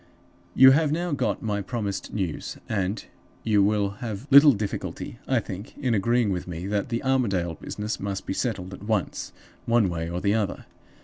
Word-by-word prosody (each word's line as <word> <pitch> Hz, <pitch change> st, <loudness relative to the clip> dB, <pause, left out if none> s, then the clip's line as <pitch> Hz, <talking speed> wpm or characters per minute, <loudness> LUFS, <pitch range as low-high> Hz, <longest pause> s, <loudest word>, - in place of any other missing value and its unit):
"You 130 Hz, 0 st, +9 dB
have 150 Hz, +2 st, +3 dB
now 175 Hz, +2 st, -1 dB
got 140 Hz, -3 st, -1 dB
my 105 Hz, -2 st, -1 dB
promised 100 Hz, -2 st, -4 dB
news, 95 Hz, -7 st, -3 dB
and 100 Hz, -1 st, -2 dB, 0.4 s
you 105 Hz, -3 st, +3 dB
will 100 Hz, 0 st, +2 dB
have 110 Hz, 0 st, -5 dB
little 140 Hz, +2 st, +9 dB
difficulty, 105 Hz, +2 st, -5 dB
I 130 Hz, -2 st, +3 dB
think, 100 Hz, -1 st, -8 dB
in 130 Hz, -5 st, 0 dB
agreeing 115 Hz, +1 st, +2 dB
with 90 Hz, -1 st, -3 dB
me 85 Hz, 0 st, -5 dB
that 100 Hz, +2 st, -1 dB
the 115 Hz, -1 st, -2 dB
Armadale 100 Hz, -11 st, +1 dB
business 105 Hz, +7 st, -5 dB
must 100 Hz, -1 st, -4 dB
be -, -, -2 dB
settled 95 Hz, -5 st, -3 dB
at -, -, -9 dB
once, 105 Hz, -2 st, -2 dB, 0.4 s
one 115 Hz, -4 st, +3 dB
way 85 Hz, -1 st, -3 dB
or 85 Hz, +1 st, -3 dB
the 100 Hz, +2 st, +1 dB
other. 105 Hz, -4 st, -1 dB
105 Hz, 180 wpm, -25 LUFS, 95-120 Hz, 0.4 s, You